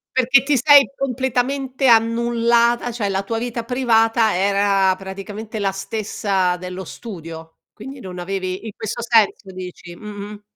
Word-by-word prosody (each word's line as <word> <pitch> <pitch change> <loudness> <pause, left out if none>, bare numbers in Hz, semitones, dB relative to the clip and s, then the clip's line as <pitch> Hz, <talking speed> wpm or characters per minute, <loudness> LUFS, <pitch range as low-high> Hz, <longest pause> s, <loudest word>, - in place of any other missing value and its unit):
Perché 255 0 +4
ti 280 0 +1
sei 280 +2 +6
completamente 260 +1 -1
annullata, 235 +1 +3
cioè 225 -3 -2
la 195 0 -1
tua 225 +3 -3
vita 235 0 -4
privata 225 -3 +2
era 195 0 +2
praticamente 200 +3 -7
la 195 -1 +1
stessa 195 -2 -1
dello 180 +1 -7
studio, 165 -6 -9
quindi 265 +5 -10
non 185 -4 -8
avevi 185 +1 -4
in 220 - -6
questo 230 +1 -5
senso 220 -4 +2
dici? 180 -1 -9
Mh-mh. 205 +1 -9
220 Hz, 135 wpm, -20 LUFS, 195-240 Hz, -, sei